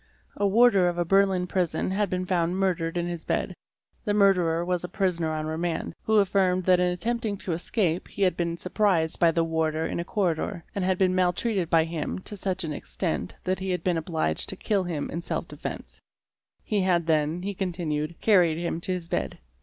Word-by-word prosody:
A 205 - +1
warder 200 -3 +5
of 175 - -4
a 175 - +1
Berlin 195 0 +3
prison 180 -1 -1
had 200 0 0
been 185 0 -2
found 180 -1 0
murdered 180 -3 0
in 175 - 0
his 175 -2 -5
bed; - - -1 0.5
the 205 -2 0
murderer 180 -5 +3
was 180 -1 -1
a 180 - -4
prisoner 180 -4 0
on 155 0 -2
remand, 160 +2 -2
who 220 - +1
affirmed 190 -2 +3
that 180 0 +4
in 180 0 +2
attempting 220 +3 -2
to 190 - -4
escape 175 +1 -1
he 200 - -3
had 185 -3 +3
been 170 -1 -2
surprised 180 -4 +1
by 170 - +5
the 165 0 +1
warder 160 -1 0
in - - -3
a - - -1
corridor, 175 -2 -1
and 200 - -2
had 185 0 +1
been 185 -1 +3
maltreated 185 +1 +1
by 165 -1 +4
him 165 -2 -3
to 190 +2 -6
such 190 -1 -2
an 155 -2 -3
extent 70 - -3
that 185 +1 0
he 190 0 -4
had 180 -1 -1
been 175 -3 +1
ob 160 - -10
liged 155 - -1
to - - -2
kill 200 -3 0
him 165 -5 -3
in 170 - -3
self - - -3
defence; - - -7 0.6
he 210 -2 0
had 175 -3 +2
then, 160 +2 +1
he 200 +1 -2
continued, 170 -4 -2
carried 180 -7 +4
him 170 -1 -3
to 185 - -3
his 175 -2 -5
bed. - - -2
180 Hz, 210 wpm, -26 LUFS, 165-190 Hz, 0.6 s, warder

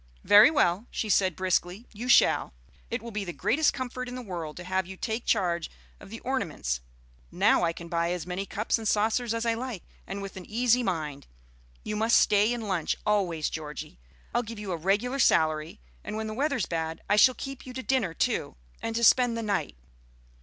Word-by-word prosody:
"Very 210 +7 +8
well," 220 - +1
she 220 - -3
said 185 -4 +3
briskly, 185 +3 -1
"you 235 +4 -6
shall. 240 - +4 0.3
It - - -3
will 235 - -7
be 210 -1 -3
the 175 - -5
greatest 210 - +2
comfort 255 -1 -5
in 250 - -6
the 255 - -6
world 170 -7 -6
to 175 - -7
have 185 0 -1
you 190 0 -9
take 225 +3 -3
charge 175 -5 +1 0.3
of - - -13
the 225 +2 -8
ornaments. 155 - -2 0.5
Now - - +3
I 170 - +2
can 170 0 -9
buy 170 0 0
as 175 -3 -3
many 185 +2 -4
cups 215 +2 -1
and 220 - -4
saucers 220 +3 +1
as 230 0 -1
I 230 - +2
like, 235 -4 -5 0.2
and 195 - -5
with 195 -1 -7
an 185 - -8
easy 245 +2 +2
mind. 155 - -3 0.6
You 215 - -3
must 225 +2 +4
stay 210 +2 +3
and 235 -3 -3
lunch, 180 -5 0
always, 185 -7 +1
Georgie. 150 - -7 0.3
I'll 240 - +2
give 230 -1 -8
you 205 -2 -5
a - - 0
regular 205 - 0
salary, 155 - +2 0.2
and - - -5
when 220 - -3
the 215 - -4
weather's 275 - 0
bad 160 -1 -4
I 205 - +3
shall 250 +4 +6
keep 270 -1 -7
you 255 - -7
to 260 0 -5
dinner 215 -8 0
too, - - -1 0.3
and 225 - -3
to 235 - 0
spend 245 0 +5
the 230 - -3
night. 200 - -2
210 Hz, 210 wpm, -27 LUFS, 175-235 Hz, 0.6 s, Very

